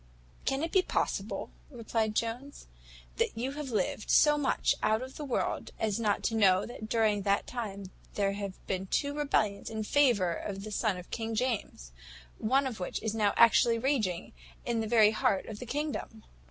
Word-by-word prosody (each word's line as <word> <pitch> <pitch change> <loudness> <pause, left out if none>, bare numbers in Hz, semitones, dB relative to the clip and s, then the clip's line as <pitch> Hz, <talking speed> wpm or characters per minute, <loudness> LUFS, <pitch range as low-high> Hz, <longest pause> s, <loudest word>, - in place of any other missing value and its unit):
"Can 270 +3 0
it 330 - -2
be 380 - +5
possible," - - -2 0.2
replied 225 -4 -2
Jones, 245 +6 -3 0.5
"that - - 0
you 255 +4 -2
have 290 -1 -5
lived 210 -1 -2
so 295 -1 +6
much 290 -2 +1
out 220 +3 +2
of 260 +1 -9
the 300 - -6
world 265 -4 -2
as 215 -1 0
not 210 -3 0
to 225 - 0
know 195 -3 +4
that 220 -2 -8
during 215 -3 +2
that 200 0 +1
time 200 -6 -6 0.2
there 200 -1 +1
have 200 -1 -4
been 190 0 -3
two 285 +8 0
rebellions 220 -9 0
in 220 -1 -3
favour 215 -9 +3
of 195 +2 -5
the 215 - -7
son 210 -2 0
of 180 - -11
King 225 -1 -3
James, 220 - -2 0.5
one 265 +5 +2
of 245 -6 -4
which 180 - -3
is 220 -1 -1
now 210 -2 +2
actually 230 0 +6
raging 225 -9 -1 0.3
in 235 -1 0
the 220 - -2
very 215 -2 +5
heart 200 -3 +1
of 215 -2 -8
the 250 - -7
kingdom." 290 -5 -4
220 Hz, 185 wpm, -30 LUFS, 205-255 Hz, 0.5 s, so